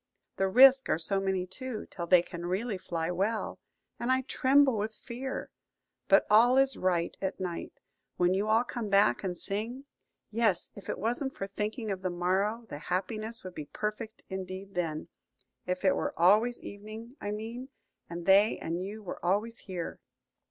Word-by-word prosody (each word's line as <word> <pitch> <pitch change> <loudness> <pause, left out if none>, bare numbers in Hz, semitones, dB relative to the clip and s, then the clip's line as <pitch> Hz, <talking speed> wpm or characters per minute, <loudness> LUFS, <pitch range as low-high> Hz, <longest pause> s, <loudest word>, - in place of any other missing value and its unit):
The 195 - +2
risks 265 +6 +7
are - - +3
so 180 +4 0
many 190 -1 0
too, 245 +4 -6
till 170 -1 -5
they 180 -1 +6
can 175 0 -6
really 195 +2 -2
fly 165 -1 -2
well, 200 +5 -1 0.4
and 240 - 0
I 260 0 +3
tremble 265 0 +4
with 215 +1 -2
fear. 260 +2 -6 0.6
But - - +5
all 235 +5 +6
is 270 0 +4
right 175 -2 0
at 190 -1 -2
night, 180 -2 -4 0.4
when 180 0 +3
you 200 +3 0
all 220 +2 +4
come 235 -3 -4
back 195 -12 +4
and 180 -2 -2
sing. 230 +9 -2 0.5
Yes, 220 -5 +1
if 200 - -10
it - - -2
wasn't 245 +6 -2
for 195 - -2
thinking 210 +3 -3
of 190 -1 -3
the 185 - -1
morrow, 190 +6 0
the 145 - -7
happiness 215 +7 -3
would 185 -1 -7
be 150 - -6
perfect 215 +6 -5
indeed 190 +1 -6
then: 165 -3 -2 0.6
if 180 +2 -2
it 190 - +5
were - - -2
always 215 +8 +4
evening, 215 +4 -9
I 205 - -3
mean, 225 +5 -5 0.4
and 170 0 -6
they 200 +3 +5
and 170 +3 -3
you 210 +3 -7
were 185 - -7
always 210 +6 0
here." 180 -4 -6
200 Hz, 175 wpm, -30 LUFS, 185-230 Hz, 0.6 s, risks